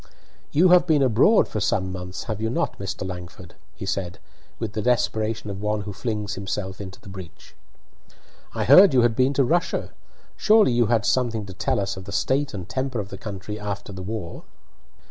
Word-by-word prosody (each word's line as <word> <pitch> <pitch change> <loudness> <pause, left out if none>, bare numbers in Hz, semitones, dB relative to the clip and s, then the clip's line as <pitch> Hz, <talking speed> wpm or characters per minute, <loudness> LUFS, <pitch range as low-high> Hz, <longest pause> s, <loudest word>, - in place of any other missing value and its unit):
"You 175 +5 +5
have 180 0 +6
been 150 -4 +4
abroad 130 - +4
for 105 - -3
some 100 -2 0
months, 90 0 -6
have 110 -2 -4
you 110 - 0
not, 165 +8 -2
Mr. 95 -1 -4
Langford?" 90 -1 -9 0.2
he - - -7
said, 95 -2 -3 0.4
with 110 -3 -4
the 110 - -2
desperation 110 -2 0
of 100 0 -6
one 105 0 -1
who 105 0 -6
flings 105 0 -3
himself 95 0 -4
into 95 -1 -9
the - - -16
breach. 95 -3 -11 1.0
"I 110 - 0
heard 145 - +8
you 125 - +5
had 120 -2 +2
been 130 +3 +2
to 140 - +3
Russia. 170 +8 0 0.4
Surely 215 - +4
you 120 -2 +3
have 115 -3 +1
something 115 -4 0
to 95 - -9
tell 95 - -1
us 95 -1 -2
of 95 - -8
the 100 - -8
state 135 +7 0
and 90 -3 -6
temper 130 -1 -2
of 100 -1 -5
the - - -7
country 105 0 -6
after 100 -1 -5
the 95 - -7
war?" 95 -3 -6
105 Hz, 200 wpm, -24 LUFS, 95-125 Hz, 1.0 s, heard